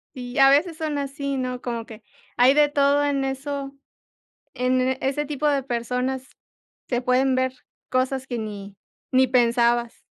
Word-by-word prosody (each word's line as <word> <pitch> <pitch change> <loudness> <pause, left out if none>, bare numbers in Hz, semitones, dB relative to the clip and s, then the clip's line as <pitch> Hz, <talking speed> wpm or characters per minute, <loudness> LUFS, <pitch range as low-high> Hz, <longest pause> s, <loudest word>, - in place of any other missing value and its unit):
Y 250 0 -5
a 270 0 +8
veces 310 +4 +3
son 310 -3 -2
así, 280 0 -3
¿no? 250 -1 -3
Como 235 -2 -4
que 220 -1 -12 0.3
hay 250 +2 +6
de 295 0 +4
todo 285 0 +3
en 280 -1 0
eso, 275 +1 -4 0.8
en 255 0 +1 0.2
ese 280 +2 -1
tipo 295 +1 -1
de 280 -2 +1
personas 250 +1 -3 0.6
se 245 -1 -1
pueden 255 +1 +2
ver 260 0 0 0.4
cosas 260 +1 0
que 245 -3 -3
ni 205 -2 -7 0.4
ni 260 0 +4
pensabas. 240 -1 +1
260 Hz, 155 wpm, -23 LUFS, 245-280 Hz, 0.8 s, a